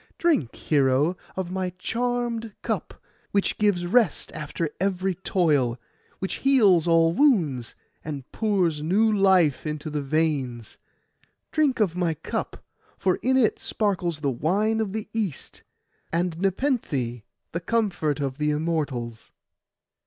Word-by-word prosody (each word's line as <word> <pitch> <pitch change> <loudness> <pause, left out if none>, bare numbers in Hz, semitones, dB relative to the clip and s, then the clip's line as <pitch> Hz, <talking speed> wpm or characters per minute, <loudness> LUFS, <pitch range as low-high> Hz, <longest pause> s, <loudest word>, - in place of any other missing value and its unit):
Drink, 320 - +1
hero, 140 +3 +2 0.2
of 185 -2 -3
my 185 -1 -1
charmed 235 +1 -2
cup, - - -3 0.3
which 200 -1 0
gives 200 -4 +2
rest 210 0 +2
after 150 +1 -4
every 190 0 0
toil, 150 -10 +1 0.4
which 190 - -3
heals 210 - +4
all 165 0 +4
wounds, 170 - +2 0.3
and 145 -3 -5
pours 185 -8 +1
new 210 +8 +3
life 190 -7 +4
into 150 0 -4
the 150 -1 -2
veins. 135 -6 -1 0.7
Drink 295 -5 +2
of 190 -6 +2
my 175 -3 0
cup, 160 - -5 0.3
for 185 -1 +1
in 260 +1 +1
it 235 -5 +2
sparkles 175 -7 -1
the 140 -3 +1
wine 200 - +1
of 215 -3 -1
the 220 +1 -4
East, 210 -9 -4 0.5
and 170 0 0
Nepenthe, 185 - -1 0.3
the 170 - -2
comfort 175 -10 0
of 135 0 -3
the 150 0 +1
Immortals. 150 -7 -2
175 Hz, 130 wpm, -25 LUFS, 150-210 Hz, 0.7 s, heals